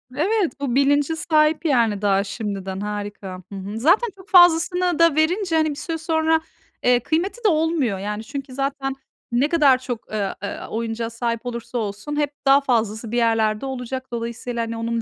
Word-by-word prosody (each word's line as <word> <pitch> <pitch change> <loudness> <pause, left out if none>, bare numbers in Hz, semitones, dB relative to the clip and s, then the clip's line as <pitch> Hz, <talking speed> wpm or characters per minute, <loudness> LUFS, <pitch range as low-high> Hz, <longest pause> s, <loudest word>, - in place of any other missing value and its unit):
Evet, 370 -2 0
bu 265 -3 -2
bilince 285 +3 +3
sahip, 310 0 +2
yani, 230 -8 +2
daha 200 -1 +2
şimdiden. 195 -2 -5
Harika. 205 -3 -6
Hı - - -5
hı. 200 +3 -6
Zaten 360 - +3
çok 380 +3 -16
fazlasını 355 -1 +5
da 335 -3 +5
verince, 340 +2 +1
hani, 315 -1 +3
bir 290 - -4
süre 325 +2 -3
sonra, 320 0 +1 0.4
eee, 245 0 +4
kıymeti 345 - -2
de - - +7
olmuyor. 310 - +1
Yani, 210 +2 -4
çünkü 275 +1 -7
zaten 275 0 -2 0.4
ne 260 +5 +2
kadar 290 -6 +5
çok, 245 -4 -7
eee, 205 -3 -2
eee, - - -4
oyuncağa 230 0 -3
sahip 230 0 -3
olursa 240 0 -5
olsun 210 +6 -4
hep 295 -1 0
daha 275 +1 +6
fazlası 225 -3 -1
bir 240 - -1
yerlerde 225 0 +1
olacak. 260 0 -5
Dolayısıyla, 235 0 -4
hani, 230 0 -4
onun 230 0 -2
255 Hz, 175 wpm, -22 LUFS, 225-315 Hz, 0.4 s, de